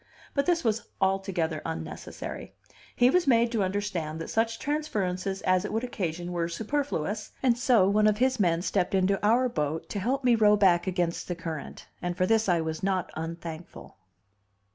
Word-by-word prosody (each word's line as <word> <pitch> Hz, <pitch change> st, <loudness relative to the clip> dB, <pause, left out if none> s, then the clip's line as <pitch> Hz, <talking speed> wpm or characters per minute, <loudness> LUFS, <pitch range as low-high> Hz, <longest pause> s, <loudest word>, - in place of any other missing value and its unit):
But 280 Hz, +2 st, 0 dB
this 345 Hz, -2 st, +2 dB
was 225 Hz, 0 st, +1 dB, 0.2 s
altogether 190 Hz, -5 st, 0 dB
unnecessary; 160 Hz, 0 st, -6 dB, 0.4 s
he 245 Hz, +1 st, +5 dB
was 360 Hz, -1 st, +2 dB
made 235 Hz, -2 st, +4 dB
to 225 Hz, -3 st, 0 dB
understand 185 Hz, -5 st, -2 dB
that 165 Hz, -, -6 dB
such 225 Hz, +1 st, +1 dB
transferences 195 Hz, -11 st, -2 dB
as 185 Hz, 0 st, +3 dB
it 210 Hz, -, -4 dB
would 225 Hz, +2 st, -1 dB
occasion 175 Hz, -7 st, -3 dB
were 170 Hz, -1 st, -1 dB
superfluous, 215 Hz, -, -2 dB
and 250 Hz, -3 st, +4 dB
so 235 Hz, -5 st, +4 dB
one 210 Hz, +2 st, +4 dB
of 210 Hz, -1 st, +2 dB
his 260 Hz, +1 st, +1 dB
men 170 Hz, -3 st, +2 dB
stepped 190 Hz, -1 st, 0 dB
into 190 Hz, +1 st, +1 dB
our 235 Hz, +5 st, +4 dB
boat 155 Hz, -7 st, -3 dB
to 205 Hz, -, -3 dB
help 260 Hz, +7 st, -1 dB
me 245 Hz, -2 st, +5 dB
to 225 Hz, -, -4 dB
row 210 Hz, 0 st, +7 dB
back 185 Hz, -3 st, +4 dB
against 175 Hz, -2 st, -1 dB
the 175 Hz, -, -2 dB
current; 165 Hz, -3 st, -7 dB
and 175 Hz, 0 st, -3 dB
for 185 Hz, -, +2 dB
this 225 Hz, 0 st, +2 dB
I 170 Hz, -2 st, +3 dB
was 160 Hz, 0 st, -4 dB
not 190 Hz, -1 st, -1 dB
unthankful. 165 Hz, +1 st, -7 dB
195 Hz, 185 wpm, -28 LUFS, 175-230 Hz, 0.4 s, row